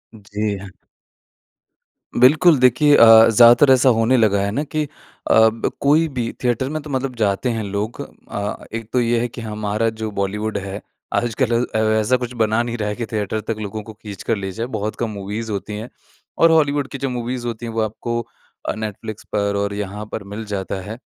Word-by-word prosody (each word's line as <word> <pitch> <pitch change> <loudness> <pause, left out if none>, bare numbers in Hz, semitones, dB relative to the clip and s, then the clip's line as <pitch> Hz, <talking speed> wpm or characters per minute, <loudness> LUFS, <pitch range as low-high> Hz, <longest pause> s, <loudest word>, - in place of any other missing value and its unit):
जी। 105 -1 -3 1.6
बिल्कुल। 150 +6 +6
देखिए 130 +4 +5
अ, 115 -2 +8
ज़्यादातर 120 +5 +7
ऐसा 130 0 +5
होने 115 +3 +3
लगा 100 -3 +3
है 100 0 -1
ना 140 +8 -1
कि 155 +1 -2 0.5
अब 110 0 +4
कोई 155 +4 +4
भी 125 -5 -3
थिएटर 125 +2 0
में 155 +1 -3
तो 150 - -10
मतलब 130 -1 -2
जाते 110 +2 0
हैं 115 -1 -2
लोग। 100 +3 -4 0.3
अ, 105 0 -4
एक 115 -1 -5
तो 125 - +3
ये 120 0 +1
है 120 - 0
कि 120 +1 -9
हमारा 110 0 -1
जो 110 - -2
बॉलीवुड 105 +2 -2
है 100 +1 -5 0.3
आजकल 120 0 +1
अ, 110 - -3 0.2
ऐसा 125 +4 +2
कुछ 125 0 -5
बना 110 -1 +1
नहीं 120 0 -4
रहा 105 -2 -2
है 105 - -3
कि 115 0 -4
थिएटर 110 0 -2
तक 115 +1 -3
लोगों 105 0 -5
को 110 +1 -10
खींच 105 -2 -10
कर - - 0
ले 95 -1 -4
जाए। 115 +5 -4
बहुत 105 +1 -3
कम 120 - -1
मूवीज़ 105 +2 -5
होती 100 +1 -4
हैं। 110 +3 -7 0.5
और 165 0 +5
हॉलीवुड 145 -3 +2
की - - -5
जो 135 0 -2
मूवीज़ 120 0 -4
होती 120 0 -5
हैं 115 - -5
वो 115 - 0
आपको 120 +2 -2 0.5
अ, - - 0
नेटफ्लिक्स 110 0 -6
पर 100 -1 0
और 100 0 -1
यहाँ 105 +1 -5
पर 110 - -4
मिल 110 +2 -5
जाता 100 -2 -4
है। 105 +4 -7
110 Hz, 200 wpm, -20 LUFS, 105-125 Hz, 1.6 s, अ